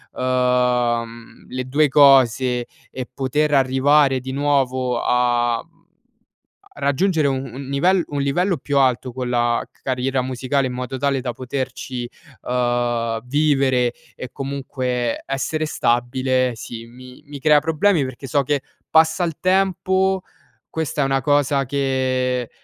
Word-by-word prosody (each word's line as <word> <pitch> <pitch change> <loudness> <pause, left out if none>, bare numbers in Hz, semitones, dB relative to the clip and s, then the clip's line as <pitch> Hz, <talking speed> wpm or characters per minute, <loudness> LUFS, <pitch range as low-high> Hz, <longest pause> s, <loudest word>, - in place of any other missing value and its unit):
ehm, 125 -2 0
le 130 0 -3
2 145 +3 +2
cose 130 -3 +4 0.2
e 130 -1 -6
poter 145 +3 0
arrivare 135 +1 +3
di 130 +1 -7
nuovo 130 -3 0
a, 120 -1 +1
mhmm, 165 0 -32 0.9
a - - -13
raggiungere 155 +2 +1
u 135 - 0
un 130 +1 -6
nivel 175 +7 +2
un 145 -1 -2
livello 175 +6 +1
più 140 +1 -1
alto 130 -1 +1
con 125 0 -4
la 120 -1 0
c - - -33
carriera 130 0 -1
musicale 130 +2 -1
in - - -5
modo 125 +1 -5
tale 140 0 0
da 125 -1 -3
poterci, 130 -1 -5 0.4
ehm, 120 -2 0
vivere 135 -4 +2 0.2
e 125 - -8
comunque 130 -3 -3
essere 135 +4 -2
stabile, 130 -1 0
sì 115 0 -8
mi 125 +2 -14
mi 145 -1 -8
crea 150 0 +5
problemi, 160 +1 +2
perché 130 +2 -8
so 140 +2 +1
che 145 +1 0 0.3
passa 160 +2 +4
il 165 -3 -3
tempo, 190 0 +1 0.5
questa 160 -2 -3
è - - +3
una 135 0 +1
cosa 145 -1 +2
che 130 -2 -1
130 Hz, 140 wpm, -21 LUFS, 125-145 Hz, 0.9 s, crea